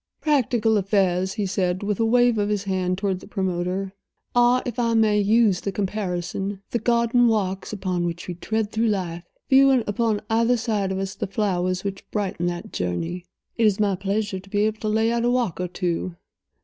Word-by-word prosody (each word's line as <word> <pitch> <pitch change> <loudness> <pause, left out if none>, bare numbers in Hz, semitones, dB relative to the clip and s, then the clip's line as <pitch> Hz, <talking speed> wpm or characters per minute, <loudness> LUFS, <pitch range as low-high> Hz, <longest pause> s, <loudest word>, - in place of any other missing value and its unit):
"Practical 240 -7 +2
affairs," 190 -2 +1
he 210 -3 -2
said, 185 -1 -1
with 205 -1 -1
a 225 - +3
wave 240 0 +3
of 205 0 0
his 205 -2 -1
hand 185 -2 -1
toward 195 -2 -1
the - - -13
promoter, 190 -1 -2 0.4
"are, 245 +1 +4
if 245 -1 -4
I 230 -1 +1
may 215 -2 +4
use 210 -2 +3
the 200 - -2
comparison, 195 -1 -3
the 235 - 0
garden 235 +1 +3
walks 195 -4 -1
upon 185 -4 -2
which 170 0 -5
we 180 - -3
tread 215 +4 -2
through 225 +1 +1
life, 175 -5 -2 0.2
viewing 270 -2 +5
upon 210 0 0
either 230 +2 +2
side 210 -4 -1
of 190 - -2
us 195 0 -3
the - - -4
flowers 185 -3 -1
which 195 -1 -6
brighten 190 -4 -2
that 175 0 -5
journey. 165 - -3 0.3
It 225 -2 +4
is 205 -1 +1
my 200 -2 +2
pleasure 200 +1 -2
to 195 +1 -16
be 205 +1 +1
able 215 0 -1
to 215 - -2
lay 220 +2 +2
out 235 0 0
a 240 - +2
walk 240 -8 0
or 180 - -1
two. 175 0 -3
205 Hz, 200 wpm, -23 LUFS, 185-225 Hz, 0.4 s, viewing